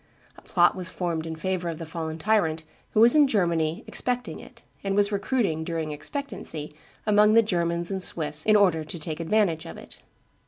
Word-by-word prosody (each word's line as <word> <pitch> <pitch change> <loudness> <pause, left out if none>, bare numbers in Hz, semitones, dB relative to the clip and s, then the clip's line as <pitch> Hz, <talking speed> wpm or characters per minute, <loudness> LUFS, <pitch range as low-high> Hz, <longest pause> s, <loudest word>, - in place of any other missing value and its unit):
A - - -16
plot 175 -2 +3
was 185 -1 -3
formed 165 -3 -3
in 160 - -5
favor 180 +1 -2
of 165 - -5
the 165 - -7
fallen 160 -1 -5
tyrant, 165 -4 +1 0.3
who 215 - +5
was 235 +1 +8
in 295 -2 +5
Germany 170 - 0
expecting 250 0 -3
it, - - -15 0.2
and 195 0 -1
was 205 0 +3
recruiting, 200 -6 -1
during 160 -2 -3
expectancy, 155 - -5 0.3
amongst 210 0 +4
the 230 - +6
Germans 170 -3 -1
and 190 -1 -3
Swiss 155 -4 +1
in 215 - +4
order 180 -6 +3
to 155 +3 -7
take 155 0 -4
advantage 170 -2 0
of 80 - -9
it. - - -13
175 Hz, 190 wpm, -25 LUFS, 160-210 Hz, 0.3 s, was